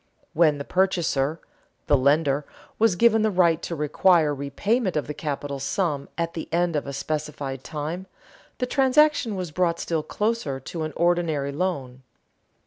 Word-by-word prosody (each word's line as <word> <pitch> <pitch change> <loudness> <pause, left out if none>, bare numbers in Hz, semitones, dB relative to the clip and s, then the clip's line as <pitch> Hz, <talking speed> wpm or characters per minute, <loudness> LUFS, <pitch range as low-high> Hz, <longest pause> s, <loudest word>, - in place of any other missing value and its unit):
When 155 -2 +4
the 140 - -5
purchaser 165 -5 +1 0.5
(the 145 - +4
lender) 140 +1 +2 0.4
was 220 -4 +4
given 225 +2 +4
the 220 - +3
right 170 -4 +3
to 170 - -4
require 155 +1 +3
repayment 185 - -1
of 145 - -1
the 150 - -5
capital 145 -2 -4
sum 145 -1 -1
at 170 0 -2
the 165 - -6
end 170 -1 +1
of 145 - -2
a - - -3
specified 145 -2 -4
time, 160 +5 -5 0.5
the 250 - 0
transaction 270 -3 +3
was 180 -4 -4
brought 170 +1 0
still 165 -2 -1
closer 210 -7 -2
to 160 +5 -6
an 155 0 -3
ordinary 170 -5 +1
loan. 140 -6 -3
165 Hz, 155 wpm, -24 LUFS, 145-185 Hz, 0.5 s, When